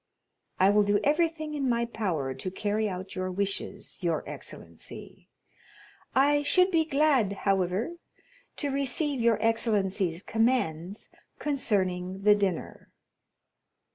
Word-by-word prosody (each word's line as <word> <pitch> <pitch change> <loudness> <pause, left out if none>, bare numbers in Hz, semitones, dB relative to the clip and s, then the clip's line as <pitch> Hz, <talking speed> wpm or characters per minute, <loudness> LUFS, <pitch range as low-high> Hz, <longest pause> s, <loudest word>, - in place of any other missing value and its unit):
"I 190 +2 +6
will 210 0 +5
do 205 0 +2
everything 310 0 +1
in 275 -3 -1
my 235 0 +1
power 175 - -2
to 135 +8 -5
carry 210 +3 -1
out 185 0 -6
your 185 0 -2
wishes, 200 +1 -3
your 165 -4 -1
excellency. - - -8 0.9
I 290 +2 +4
should 365 +6 +3
be 325 -2 +3
glad, 280 -8 +2
however, 195 - 0 0.6
to 290 - -1
receive 275 0 0
your 230 -2 +4
excellency's 200 -6 +1
commands 210 -6 0 0.3
concerning 190 -9 -1
the 210 0 +7
dinner." 200 -4 -2
210 Hz, 115 wpm, -28 LUFS, 190-275 Hz, 0.9 s, the